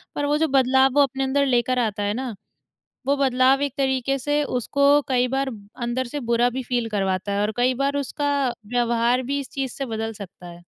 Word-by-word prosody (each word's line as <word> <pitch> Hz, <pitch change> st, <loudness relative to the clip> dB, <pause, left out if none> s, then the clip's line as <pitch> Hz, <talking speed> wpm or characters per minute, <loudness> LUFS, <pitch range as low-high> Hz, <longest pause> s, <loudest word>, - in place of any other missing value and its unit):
पर 290 Hz, -, -1 dB
वो 295 Hz, +1 st, +1 dB
जो 320 Hz, -, +2 dB
बदलाव 265 Hz, -1 st, +4 dB
वो 290 Hz, -, +5 dB
अपने 270 Hz, 0 st, -2 dB
अंदर 280 Hz, +1 st, +1 dB
लेकर 250 Hz, -1 st, +1 dB
आता 215 Hz, -3 st, -1 dB
है 205 Hz, 0 st, 0 dB
ना, 250 Hz, -1 st, -4 dB, 0.7 s
वो 280 Hz, -, +2 dB
बदलाव 265 Hz, 0 st, +3 dB
एक 285 Hz, -, -1 dB
तरीके 265 Hz, 0 st, 0 dB
से 290 Hz, +3 st, 0 dB
उसको 275 Hz, +2 st, -1 dB, 0.2 s
कई 250 Hz, -1 st, +2 dB
बार 270 Hz, +1 st, -1 dB, 0.3 s
अंदर 240 Hz, +2 st, -1 dB
से 290 Hz, +4 st, -5 dB
बुरा 235 Hz, +1 st, +3 dB
भी 260 Hz, +2 st, -4 dB
फ़ील 240 Hz, -2 st, -2 dB
करवाता 195 Hz, -1 st, -1 dB
है 200 Hz, -, 0 dB
और 210 Hz, +1 st, 0 dB
कई 250 Hz, +1 st, +2 dB
बार 275 Hz, +2 st, -1 dB
उसका 285 Hz, +1 st, -2 dB, 0.4 s
व्यवहार 240 Hz, +1 st, +1 dB
भी 275 Hz, +3 st, -2 dB
इस 275 Hz, -, -8 dB
चीज़ 270 Hz, -2 st, -3 dB
से 275 Hz, -, -5 dB
बदल 225 Hz, 0 st, -3 dB
सकता 195 Hz, -3 st, -11 dB
है। 175 Hz, 0 st, -11 dB
255 Hz, 210 wpm, -23 LUFS, 235-275 Hz, 0.7 s, वो